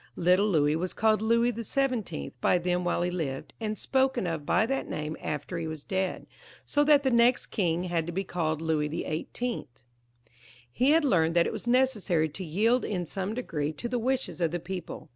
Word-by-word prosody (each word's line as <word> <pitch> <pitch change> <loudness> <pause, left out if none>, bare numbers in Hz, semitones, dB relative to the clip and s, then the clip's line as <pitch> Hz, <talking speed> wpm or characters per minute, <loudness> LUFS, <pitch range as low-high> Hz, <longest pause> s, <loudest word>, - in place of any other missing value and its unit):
Little 180 +4 +3
Louis 150 -6 +3
was 180 +3 -2
called 215 -1 +3
Louis 230 +2 +3
XVII. 230 - -2
by - - +4
them 180 0 0
while 175 0 0
he 180 - -1
lived, 145 -7 -4
and 215 -1 -2
spoken 265 -1 +1
of 160 -4 -3
by 220 - +3
that 270 +3 -2
name 155 +1 -3
after 150 +4 -4
he 165 - -3
was 155 -2 -6
dead, 190 -2 -2 0.4
so 290 - +2
that 290 -1 +5
the 265 - +2
next 235 +1 +3
king 175 -4 0
had 170 -3 -1
to - - -3
be 190 +3 -2
called 160 -4 -2
Louis 155 -2 0
XVIIL 170 +9 -3 1.0
He 255 - +2
had 315 0 +4
learned 165 - +2
that 170 - +5
it - - -2
was 220 +2 -6
necessary 215 -11 +2
to 185 +6 -7
yield 215 +10 +2
in 180 -4 -2
some 195 +5 -3
degree 155 -12 -2
to 240 - -5
the 245 0 -1
wishes 245 -8 -1
of 165 - +3
the 175 +2 -3
people. 175 -3 -7
185 Hz, 200 wpm, -28 LUFS, 165-235 Hz, 1.0 s, that